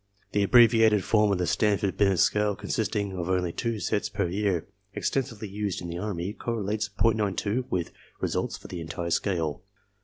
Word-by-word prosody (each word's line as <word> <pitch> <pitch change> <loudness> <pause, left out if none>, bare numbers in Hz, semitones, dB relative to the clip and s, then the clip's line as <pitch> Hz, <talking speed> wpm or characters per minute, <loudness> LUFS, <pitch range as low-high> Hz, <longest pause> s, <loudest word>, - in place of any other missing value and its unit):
The 105 - +1
abbreviated 110 -1 +5
form 105 0 +3
of 100 - +2
the 90 - 0
Stanford 100 0 +1
Binet 95 -2 +3
scale 105 +3 +2
consisting 105 -1 -2
of 90 -1 -3
only 90 -2 0
two 115 -3 -2
tests 105 0 -1
per 100 -2 -1
year, 95 -2 -1 0.3
extensively 115 -5 -2
used 100 -1 -3
in 90 - -6
the 85 +1 -4
army, 95 -1 -3
correlates 105 -2 -2
.92 110 +1 +1
with 90 -2 -2 0.3
results - - -2
for - - -12
the 90 -2 -6
entire 85 +1 -4
scale. 80 -5 0
100 Hz, 165 wpm, -27 LUFS, 90-105 Hz, 0.3 s, abbreviated